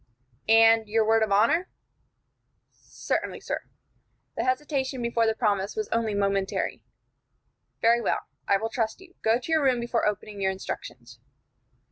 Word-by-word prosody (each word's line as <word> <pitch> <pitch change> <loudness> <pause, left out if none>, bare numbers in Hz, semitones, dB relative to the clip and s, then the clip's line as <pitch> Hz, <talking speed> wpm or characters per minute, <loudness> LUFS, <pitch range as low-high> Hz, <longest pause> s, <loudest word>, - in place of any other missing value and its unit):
"And 225 0 +6
your 220 0 +2
word 225 +1 +3
of 220 -2 0
honor?" 235 - +3 1.0
"Certainly, - - -4
sir." - - -3 0.7
The - - -1
hesitation 265 0 -1
before 235 -1 +1
the 220 - +1
promise 205 -3 0
was 430 -1 -3
only 225 -2 0
momentary. 195 -1 -1 1.0
"Very 235 +1 +4
well. 220 - 0 0.3
I 200 - +4
will 225 +3 -3
trust 225 +1 -2
you. 375 -1 -16
Go 220 +1 +3
to 255 +6 -7
your 315 -2 +3
room 255 -3 +3
before 235 -2 0
opening 210 0 -4
your 190 - +2
instructions." 125 -10 -7
225 Hz, 145 wpm, -26 LUFS, 205-245 Hz, 1.0 s, And